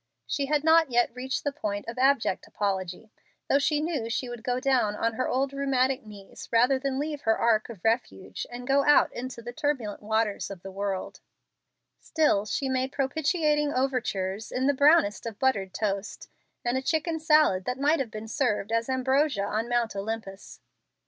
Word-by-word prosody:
She 280 -1 -2
had 300 0 +1
not 325 -1 +5
yet 240 -1 +2
reached 255 +1 -3
the 285 - 0
point 210 -8 -4
of 230 +2 -6
abject 265 -7 +2
apology, 195 +1 -3 0.4
though 280 - +3
she 295 +1 +1
knew 300 -8 -2
she 250 +1 -2
would 240 -2 -7
go 250 0 -1
down 255 -6 +1
on 230 +2 0
her 255 +3 -1
old 270 +2 0
rheumatic 270 -1 +1
knees 205 -2 -12
rather 245 +3 +4
than 270 0 -2
leave 295 0 -3
her 220 0 +2
ark 225 -1 +2
of 210 -7 -10
refuge 225 -4 -2
and 245 +1 -8
go 275 +2 +3
out 295 +1 +4
into 245 -1 -6
the 240 +1 -7
turbulent 270 -8 -2
waters 220 -1 -1
of 195 -3 -9
the 195 - -7
world; 195 -1 -4 0.8
still 255 -10 +1
she 270 - -1
made 260 0 -1
propitiating 295 +1 +1
overtures 220 -6 -1
in 255 +1 -1
the 285 - +4
brownest 280 -7 +4
of 220 -3 -6
buttered 205 -8 0
toast, 200 0 -3 0.4
and 245 +2 +1
a - - -6
chicken 320 +3 -1
salad 305 - +3
that 250 +1 -2
might 295 +4 +2
have 265 -4 -2
been 215 0 -7
served 220 -4 -1
as 230 +2 0
ambrosia 260 -2 +1
on 220 +3 -2
Mount 240 -3 0
Olympus. 200 -1 -6
250 Hz, 180 wpm, -27 LUFS, 215-275 Hz, 0.8 s, not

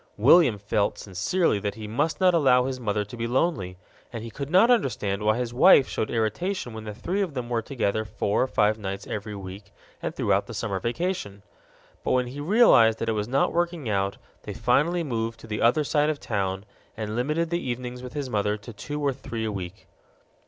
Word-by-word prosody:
William 130 +1 +6
felt 100 0 -1
sincerely 105 - 0
that 100 0 -3
he 110 -1 -7
must 145 +9 -1
not 185 -1 +4
allow 130 -6 +4
his 130 -1 -3
mother 105 -3 -1
to 100 - -10
be 115 0 -3
lonely, 120 - 0 0.3
and 115 -2 -6
he 115 - -7
could 140 +3 -6
not 190 +8 +5
understand 110 - 0
why 110 +1 +2
his 120 -1 -3
wife 135 0 +6
showed 110 - -2
irritation 120 - -2
when 110 0 -8
the 105 -1 -6
three 185 - -2
of 175 -8 -2
them 120 -2 -4
were 120 -2 0
together 110 -3 -1
four 105 -1 -1
or 130 - +2
five 110 -3 +1
nights 100 0 -5
every 105 0 -5
week 95 +1 -9 0.3
and - - -4
throughout - - +1
the - - -7
summer 95 -2 -2
vacation. 115 - -3 0.6
But - - 0
when 125 -1 +2
he 130 +4 -8
realized 145 - +5
that 115 - -2
it - - +1
was 105 -1 -2
not 135 +3 +1
working 170 -5 -1
out, 100 -1 0 0.2
they - - -7
finally 170 +4 +2
moved 115 -5 -3
to - - -11
the 105 -1 -4
other 125 +6 +4
side 150 +1 +1
of 150 -2 -2
town 95 -2 -2 0.3
and 110 -1 -4
limited 150 +7 -1
the 170 0 0
evenings 125 0 -4
with 125 -1 -8
his 145 -2 -3
mother 105 -2 0
to 105 +3 -11
two 145 +8 -6
or 140 -2 +1
three 115 -4 -5
a 110 - -2
week. 95 0 -7
115 Hz, 215 wpm, -25 LUFS, 105-145 Hz, 0.6 s, William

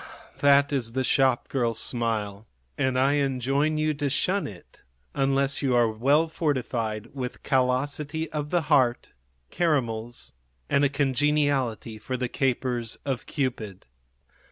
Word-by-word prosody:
That 140 0 +4
is 115 -4 -1
the 130 +1 0
shopgirl 130 -3 +1
smile, 110 -3 -2 0.3
and 130 -1 0
I 135 +3 +3
enjoin 140 +3 0
you 155 0 +1
to 145 -1 -2
shun 190 +8 +1
it 95 -5 -13 0.3
unless 135 0 +1
you 130 -3 +1
are 120 -2 +3
well 140 +9 +2
fortified 120 -8 -2
with 130 -3 -6
callosity 145 +4 0
of 150 -1 -3
the 175 +1 +2
heart, 130 -5 +2 0.4
caramels 120 -8 -1 0.4
and 140 - +3
a 140 - +4
congeniality 140 -5 0
for 125 +4 -4
the 125 -1 -2
capers 125 -3 -1
of 135 -3 -3
Cupid. 120 - -3
135 Hz, 130 wpm, -26 LUFS, 120-145 Hz, 0.4 s, That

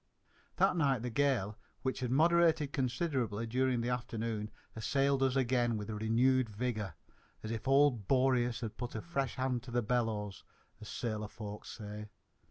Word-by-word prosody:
That - - +3
night 135 -8 +2
the 125 - -3
gale, 115 -6 +1 0.2
which 130 0 -1
had 125 -2 -2
moderated 160 +1 +4
considerably 125 -5 -1
during 125 +1 +1
the 120 - -1
afternoon, 115 -3 -2 0.3
assailed 135 +4 +1
us 135 -1 +2
again 120 -3 +2
with 105 +1 -5
renewed 115 +4 +2
vigour, 105 -5 -3 0.5
as 110 - -4
if 115 +2 -4
old 135 -7 +4
Boreas 125 -2 +2
had 115 -3 -5
put 120 -2 -5
a 110 - -2
fresh 140 -6 -2
hand 130 -2 0
to 130 - -11
the 120 0 0
bellows, 110 -4 -1 0.4
as 105 - -8
sailor 110 -3 -3
folk 105 0 -8
say. 105 -1 -7
120 Hz, 160 wpm, -33 LUFS, 110-130 Hz, 0.5 s, moderated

